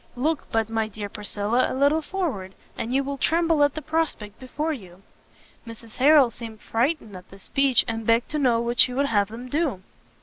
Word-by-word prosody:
look 295 +4 -1
but, 225 -1 +1
my 225 -1 -1
dear 210 -1 -6
Priscilla, 210 +3 -1
a - - -3
little 285 +3 +3
forward, 290 - -4 0.2
and 230 - -4
you 270 +2 +2
will 280 0 -5
tremble 330 -2 +2
at 285 -1 +2
the 310 - -5
prospect 310 -9 -2
before 300 +5 -3
you!" 190 -7 -11 0.6
Mrs 230 -1 -11
Harrel 275 -2 +6
seemed 225 -1 -9
frightened 230 - -1
at 180 - -12
this 195 0 -15
speech, 275 -4 +2
and 225 0 -3
begged 230 +1 +2
to 305 - -1
know 245 -5 +3
what 235 0 -2
she 250 +2 +5
would 280 +2 +2
have 205 -6 +2
them 230 +4 -9
do? 275 - -1
245 Hz, 200 wpm, -24 LUFS, 220-290 Hz, 0.6 s, Harrel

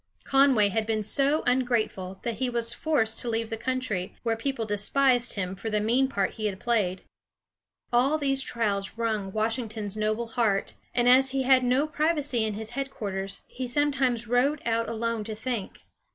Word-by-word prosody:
Conway 270 -7 +4
had 220 +2 -1
been 215 -1 0
so 280 +8 +1
ungrateful 235 -7 0
that 235 -2 -3
he 260 -1 0
was 235 -1 -1
forced 240 -7 0
to 240 - -1
leave 225 0 -2
the - - -1
country, 225 -6 -3
where 230 -1 +1
people 235 0 -2
despised 240 +4 +2
him 190 -2 -3
for 200 +4 -5
the 210 -1 +1
mean 240 +6 +2
part 200 -7 -1
he 215 -1 -3
had 195 -2 -4
played. 200 -6 0 0.9
All 265 +6 +3
these 275 -2 +1
trials 210 -5 -2
wrung 215 -4 -1
Washington's 220 -1 -2
noble 215 +2 -1
heart, 220 -4 0 0.2
and 240 0 +3
as 260 +2 +6
he 270 -1 +1
had 260 0 +5
no 255 +4 +2
privacy 300 -6 0
in 215 -1 -2
his 220 +1 -6
headquarters, 205 -7 -4
he 255 0 -5
sometimes 260 -3 +1
rode 255 +5 +2
out 230 0 0
alone 230 -1 -2
to 220 0 -5
think. 225 -2 -5
230 Hz, 175 wpm, -27 LUFS, 215-260 Hz, 0.9 s, as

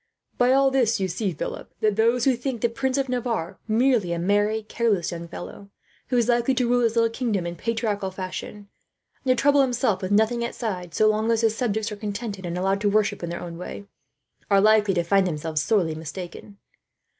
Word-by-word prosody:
"By 245 +1 +4
all 270 0 +4
this 240 -5 +2
you 190 - 0
see, 190 +2 -2
Philip, 155 - -6
that 215 -2 +2
those 230 +2 +2
who 265 -2 +4
think 240 -1 -4
the 235 - +2
Prince 260 +3 -1
of 270 -1 0
Navarre 235 -8 -2
merely 225 -5 +2
a - - -2
merry, 205 +5 +1
careless 215 -5 0
young 170 -1 -6
fellow, 200 +3 -9 0.4
who 250 - 0
is 235 -2 +2
likely 240 +2 +2
to 250 -1 +1
rule 245 +1 +3
his 230 -1 +1
little 230 -1 +3
kingdom 225 -7 -1
in 170 0 -4
patriarchal 220 -3 -2
fashion; 190 +2 -7 0.6
and 255 -1 +2
to - - 0
trouble 285 0 +4
himself 245 -5 +1
with 185 - -3
nothing 220 +3 +2
outside, 190 -8 -4
so 215 - +4
long 215 +1 +1
as 230 -1 +2
his 225 -1 +2
subjects 220 -2 -1
are 210 - -6
contented 205 -2 -5
and 170 +1 -3
allowed 195 +2 0
to 205 - +2
worship 210 0 +1
in 170 - -4
their 170 - -5
own 170 -1 -7
way, 200 +2 -7 0.6
are 200 -1 +5
likely 210 -1 +4
to 175 - +1
find 195 +2 +3
themselves 155 -2 -2
sorely 175 -4 +1
mistaken. 175 +5 -8
215 Hz, 210 wpm, -24 LUFS, 190-235 Hz, 0.6 s, are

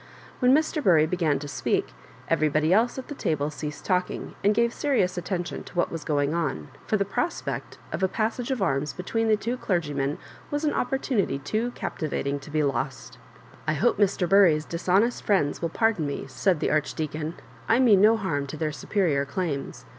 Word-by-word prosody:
When 250 0 +4
Mr. 310 +1 +2
Bury 160 -7 +5
began 160 -3 +1
to 145 +2 -6
speak, 135 -4 -1 0.4
everjrbody 155 0 +2
else 230 +7 +3
at 260 - -6
the - - -5
table 155 - -1
ceased 150 0 -6
talkmg, 180 -1 -1
and 205 +1 +4
gave 235 0 +2
serious 250 -11 +1
at 175 - -5
tention 175 -3 -3
to - - -14
what 175 - +1
was 165 -2 -5
going 145 0 0
on, 145 - -2 0.2
for 215 - +2
the 200 - 0
prospect 335 - -3
of - - -3
a 190 - +4
passage 225 +5 -2
of 255 -7 0
arms 140 -3 0
between 225 - -1
the 215 - +5
two 235 +4 -3
clergymen 145 - -1 0.3
was 290 +1 -1
an 295 - +1
opportunity 250 - 0
too 215 - -2
captivating 145 -3 -3
to 140 - -12
be 155 0 +1
lost 130 -2 -3 0.2
*' - - -23
I 155 - +2
hope 150 - +1
Mr. 195 -3 +2
Biiry's 170 -5 +5
dishonest 190 +7 +1
friends 185 -9 +1
will 165 - 0
par 225 +7 +2
don 160 -8 -3
me," 140 - -4
said 160 +5 0
the - - +1
Archdeacon; 155 +1 -2 0.3
"I 225 - +5
mean 225 -7 +5
no 220 +2 +6
harm 145 -9 -2
to 155 - -6
their 155 0 -1
superior 150 -2 0
claims. 145 -3 -4
175 Hz, 195 wpm, -26 LUFS, 150-215 Hz, 0.4 s, no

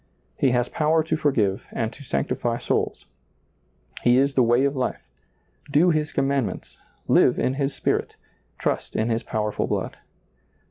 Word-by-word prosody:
He 135 - +2
has 120 0 +1
power 155 +3 +1
to 160 - -1
forgive 115 -11 0
and 115 0 -2
to 145 - -12
sanctify 120 -2 -1
souls; - - -2 1.0
He 120 0 +4
is 140 +1 +3
the 130 - +3
way 120 +3 +3
of 140 0 0
life; 130 -1 -3 0.6
do 160 +5 +4
Hts 155 0 -1
commandments, 135 -4 -2 0.3
live - - +4
in 130 - +1
His 140 0 -2
spirit, - - -1 0.4
trust - - -2
in 110 +2 0
His 115 0 0
powerful 105 -1 -2
blood. - - -3
130 Hz, 150 wpm, -24 LUFS, 120-145 Hz, 1.0 s, He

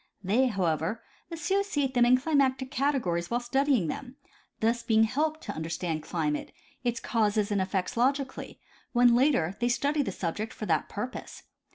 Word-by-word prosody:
They, 225 +8 +3
however, 185 +1 -1 0.3
associate 330 -5 -1
them 240 -1 +4
in 255 +1 +6
climatic 265 -2 +1
categories 250 -13 0
while 240 - +1
studying 265 - +1
them, 250 - -5 0.4
thus 230 +2 +1
being 225 -1 +3
helped 305 +7 0
to - - -5
understand 160 0 -3
climate, 155 -2 -2 0.3
its 240 -1 0
causes 215 -3 +1
and 200 -2 +1
effects 190 +4 -2
logically, 265 +3 -1 0.3
when 245 -1 +5
later, 245 - +2
they 240 0 +1
study 285 +4 +1
the 255 - -2
subject 190 +5 -3
for 215 - -6
that - - 0
purpose. 230 +5 -6
240 Hz, 155 wpm, -28 LUFS, 195-270 Hz, 0.4 s, in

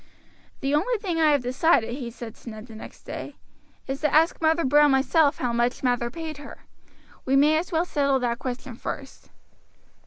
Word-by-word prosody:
"The 275 0 -1
only 415 +12 +1
thing 365 -6 -3
I 315 -1 +5
have 285 -4 +2
decided," 250 -1 +2
he 250 -2 -5
said 230 -1 -9
to 235 - -11
Ned 215 0 -9
the 230 - -13
next 220 - -11
day, - - -7 0.5
"is 270 +1 -5
to 300 -2 +1
ask 325 +3 +3
Mother 320 0 +2
Brown 295 +2 +5
myself 285 +2 +3
how 245 -2 -2
much 240 +2 0
Mather 245 -2 +1
paid 315 +2 -7
her. 285 -1 -12 0.6
We 265 - +1
may 295 +3 +5
as 360 - -6
well 330 +1 +1
settle 280 -5 +1
that 235 -1 -1
question 255 -1 -6
first." 270 +3 -8
275 Hz, 190 wpm, -25 LUFS, 245-315 Hz, 0.6 s, I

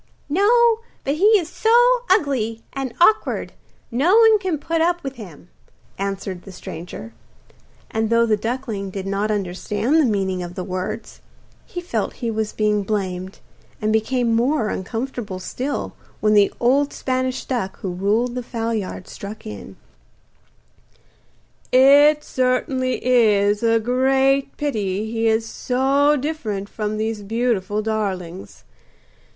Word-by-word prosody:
'No; 450 +7 +4 0.2
but 275 - 0
he 420 +5 +6
is 345 -5 -3
so 480 +6 +4
ugly 260 - +1
and 270 -2 -3
awkward 425 +5 +3 0.4
no 305 - +3
one 445 -2 +6
can 370 -5 -1
put 330 +3 -1
up 345 +1 +1
with 270 -1 -6
him,' 180 -6 -11 0.5
answered 195 -2 -4
the 195 - -12
stranger. 165 -10 -8 0.8
And 220 0 0
though 230 0 +4
the 220 -2 +2
duckling 225 -3 -4
did 190 0 -6
not 200 +2 -1
understand 210 - -1
the 310 - +4
meaning 190 -3 -1
of 175 0 -7
the 185 - -4
words, 185 +4 -5 0.5
he 355 - -6
felt 355 - -2
he 235 -2 -3
was 220 -1 -2
being 210 -1 +1
blamed, 190 -2 -3 0.4
and 215 0 0
became 230 +2 +1
more 240 -1 +1
uncomfortable 225 0 -4
still 255 +9 -4 0.3
when 215 0 +2
the 205 -1 +5
old 275 +4 +2
Spanish 255 0 -2
duck 235 -8 -3
who 190 - -3
ruled 210 +7 0
the 250 - -3
fowlyard 225 -6 -4
struck 210 +2 -9
in: 100 -2 -8 2.0
'It 285 +3 +6
certainly 255 0 -1
is 210 -5 +3
a 230 -1 +3
great 265 +3 +1
pity 215 -7 -2
he 225 0 0
is 225 0 +1
so 275 +5 +2
different 240 -9 -3
from 215 -1 -3
these 220 0 -2
beautiful 215 -1 -1
darlings. 195 -5 -4
230 Hz, 135 wpm, -21 LUFS, 205-270 Hz, 2.0 s, he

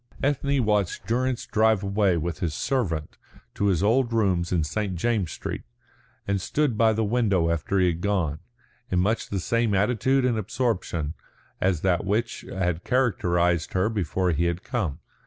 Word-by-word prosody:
Ethne 140 -2 +1
watched 105 -2 0
Durrance 125 +3 0
drive 110 -2 +2
away 100 -2 +2
with 85 0 -3
his 80 -4 -2
servant 90 - -2 0.3
to 100 - 0
his 95 -2 +2
old 120 +3 +3
rooms 95 -6 +1
in 85 -3 +2
St. 100 +4 -2
James's 100 -2 0
Street, - - -5 0.7
and 100 -1 0
stood 145 +2 0
by 110 +1 +4
the 110 +1 0
window 100 -7 +2
after 85 +4 -1
he 95 - +4
had 85 -1 0
gone, 90 -7 0 0.5
in 90 - 0
much 105 +6 +1
the 100 - -1
same 115 +2 +1
attitude 125 +6 +2
and 120 -3 +1
absorption 95 - -2 0.5
as 90 -4 +1
that 90 -3 +1
which 105 +4 -1
had 90 -3 -1
characterised 90 -9 +1
her 95 +3 +2
before 95 -3 0
he 85 +2 +1
had 85 +3 -1
come. 95 - -2
100 Hz, 165 wpm, -25 LUFS, 85-115 Hz, 0.7 s, by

